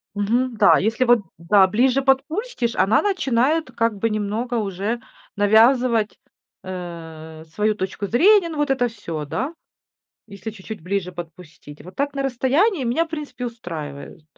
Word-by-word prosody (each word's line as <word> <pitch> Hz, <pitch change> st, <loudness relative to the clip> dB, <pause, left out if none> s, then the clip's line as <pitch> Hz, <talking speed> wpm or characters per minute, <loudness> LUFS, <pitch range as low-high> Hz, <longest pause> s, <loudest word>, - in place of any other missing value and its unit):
Мгм, 235 Hz, +5 st, 0 dB
да. 205 Hz, -, +6 dB
Если 225 Hz, +5 st, +1 dB
вот, 240 Hz, -1 st, +5 dB, 0.2 s
да, 190 Hz, +4 st, +4 dB
ближе 255 Hz, +6 st, +2 dB
подпустишь, 270 Hz, -, 0 dB
она 215 Hz, +3 st, +3 dB
начинает 310 Hz, -, +1 dB
как 230 Hz, -2 st, 0 dB
бы 225 Hz, +3 st, 0 dB
немного 215 Hz, +4 st, -2 dB
уже 210 Hz, +2 st, -2 dB, 0.3 s
навязывать, 225 Hz, +2 st, +3 dB, 0.4 s
э, 165 Hz, -4 st, -8 dB
свою 210 Hz, +7 st, 0 dB
точку 190 Hz, +1 st, -4 dB
зрения. 360 Hz, -, +4 dB
Ну, 315 Hz, -, -6 dB
вот 295 Hz, -1 st, 0 dB
это 260 Hz, -2 st, +2 dB
всё, 170 Hz, -9 st, -6 dB
да, 265 Hz, -, -3 dB, 0.7 s
если 200 Hz, +1 st, -7 dB
чуть-чуть 205 Hz, -2 st, -9 dB
ближе 180 Hz, 0 st, -2 dB
подпустить. 165 Hz, -3 st, -11 dB
Вот 180 Hz, -, -12 dB
так 285 Hz, +1 st, -1 dB
на 275 Hz, -, -2 dB
расстоянии 270 Hz, -, +1 dB
меня, 250 Hz, +8 st, +1 dB
в 325 Hz, -, -18 dB
принципе, 285 Hz, -6 st, -6 dB
устраивают. 160 Hz, -11 st, -7 dB
225 Hz, 145 wpm, -22 LUFS, 190-265 Hz, 0.7 s, да